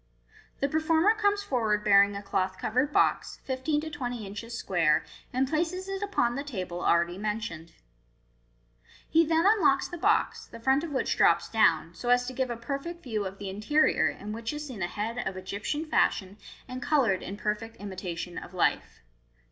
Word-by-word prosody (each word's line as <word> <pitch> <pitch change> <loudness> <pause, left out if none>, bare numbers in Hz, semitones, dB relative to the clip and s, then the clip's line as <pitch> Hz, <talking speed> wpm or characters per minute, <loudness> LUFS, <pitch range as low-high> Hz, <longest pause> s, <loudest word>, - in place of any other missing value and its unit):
The 280 - +3
performer 320 +6 +3
comes 410 -2 +1
forward 220 - 0
bearing 200 -1 +5
a 200 - -5
cloth 190 -1 -1
covered 255 +6 0
box, - - +1
fifteen 265 +3 -1
to 315 0 -6
twenty 245 -6 -4
inches 230 +4 -6
square, 165 -7 +2 0.3
and 260 +2 +1
places 340 +5 -1
it 390 0 -4
upon 245 -13 +1
the 275 +3 -3
table 185 -10 -5
already 170 +2 +2
mentioned. 205 -6 -4 1.3
He 325 +1 +4
then 325 +2 +2
unlocks 405 -9 +4
the 350 - -8
box, 410 +5 +1
the 230 - -11
front 265 +5 +2
of 335 - -4
which 270 -3 0
drops - - +4
down, 165 -7 +3
so 205 +8 -5
as 245 0 +4
to 255 - -5
give 260 0 -1
a 240 - -3
perfect 280 +8 -5
view 215 -6 -2
of 190 +1 -9
the 200 -1 -6
interior, 220 +11 +2
in 210 +1 -7
which 225 +1 -4
is 295 0 -5
seen 250 -8 -8
a 175 - 0
head 225 +6 -4
of 195 -5 -3
Egyptian 200 - -3
fashion, 200 -9 +1 0.3
and 255 0 -6
coloured 245 -10 +2
in 195 - -6
perfect 215 +2 -3
imitation 180 -3 -6
of 185 - -12
life. 175 - 0
235 Hz, 180 wpm, -28 LUFS, 200-295 Hz, 1.3 s, bearing